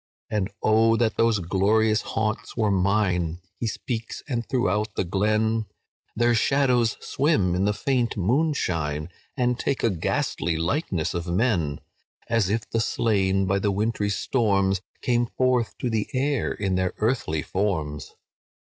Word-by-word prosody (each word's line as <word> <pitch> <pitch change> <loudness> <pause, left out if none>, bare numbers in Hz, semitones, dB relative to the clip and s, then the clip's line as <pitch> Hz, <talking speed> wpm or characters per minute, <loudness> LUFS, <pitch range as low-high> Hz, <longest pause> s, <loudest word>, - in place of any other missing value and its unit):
"'And 105 -2 0
oh 115 +1 +4
that 115 -1 +1
those 115 -1 +3
glorious 105 +4 +2
haunts 110 +1 -3
were 110 -3 +2
mine!' 90 -4 +1 0.2
He 115 - -1
speaks, 115 0 -4
and 120 -5 -1
throughout 110 -4 0
the - - 0
glen 110 +4 +1 0.5
Their 120 +1 +3
shadows 125 -1 +2
swim 135 - +1
in 95 +2 +1
the 105 - +2
faint 125 -4 0
moonshine, 90 - 0 0.3
And 125 -1 +1
take 140 - -1
a 115 - +3
ghastly 85 -1 -1
likeness 85 - -1
of 85 0 -3
men, 85 - 0 0.5
As 115 -5 +1
if 110 +1 -1
the 115 - -1
slain 95 -5 +1
by 95 +1 +1
the 100 - 0
wintry 105 +1 0
storms 100 -4 +1 0.2
Came 120 -1 +2
forth 125 -1 0
to - - -2
the 110 -3 -1
air 140 +1 0
in 100 -2 -2
their 95 0 0
earthly 105 - 0
forms. 80 -8 -2
105 Hz, 145 wpm, -25 LUFS, 95-120 Hz, 0.5 s, oh